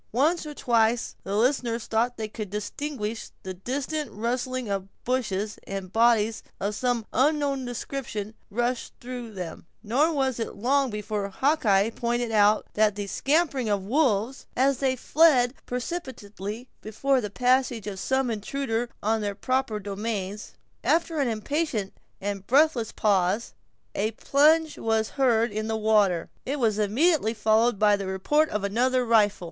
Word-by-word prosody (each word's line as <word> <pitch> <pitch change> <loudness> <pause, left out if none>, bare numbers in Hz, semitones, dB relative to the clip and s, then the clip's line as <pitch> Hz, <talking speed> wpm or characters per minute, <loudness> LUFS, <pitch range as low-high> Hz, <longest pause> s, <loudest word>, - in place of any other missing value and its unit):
Once 305 +6 +2
or 300 - -7
twice 230 -2 +1
the 195 - -3
listeners 240 -1 +1
thought 235 +2 0
they 220 -1 -3
could 215 -1 -6
distinguish 220 +2 -4
the 190 - -5
distant 275 - -3
rustling 250 +2 -2
of 195 -1 -2 0.2
bushes, 215 -5 -1
as 195 0 -3
bodies 225 0 +3 0.2
of 205 +1 -1
some 245 0 -1
unknown 280 0 +1
description 235 -3 -5 0.2
rushed 240 +3 -2
through 245 -2 -7
them; 180 -4 -7 0.2
nor 270 +9 +2
was 265 -5 0
it 225 - -4
long 270 +4 +2
before 210 -1 -3
Hawkeye 220 -4 +2
pointed 240 0 -1
out 210 0 +4
the 210 -1 +1
"scampering 275 - +1
of 200 -2 0
the 195 - -10
wolves," 255 -3 +1
as 270 0 +2
they 265 -1 +1
fled 260 -2 +4
precipitately 245 - -5
before 260 +5 0
the 210 - -4
passage 250 -1 +1
of 200 -2 -5
some 265 +1 0
intruder 230 +2 -2
on 220 +1 +1
their 205 -1 -2
proper 255 -1 -1
domains. 205 0 -4 0.3
After 330 -1 +1
an 275 - +2
impatient 230 -1 -2 0.3
and 200 -1 -4
breathless 270 -4 +3
pause, 200 +1 +1 0.4
a 210 +2 0
plunge 305 +6 +3
was 220 -1 +1
heard 240 -4 +2
in 215 +1 -3
the 220 0 -1
water, 210 -6 +2 0.2
and 270 - 0
it 290 - -3
was 220 -4 +1
immediately 230 - +2
followed 220 +1 +3
by 210 0 +4
the 200 -1 -5
report 295 +12 +1
of 210 -1 -2
another 250 +5 +1
rifle. 215 -3 +3
230 Hz, 150 wpm, -26 LUFS, 210-265 Hz, 0.4 s, out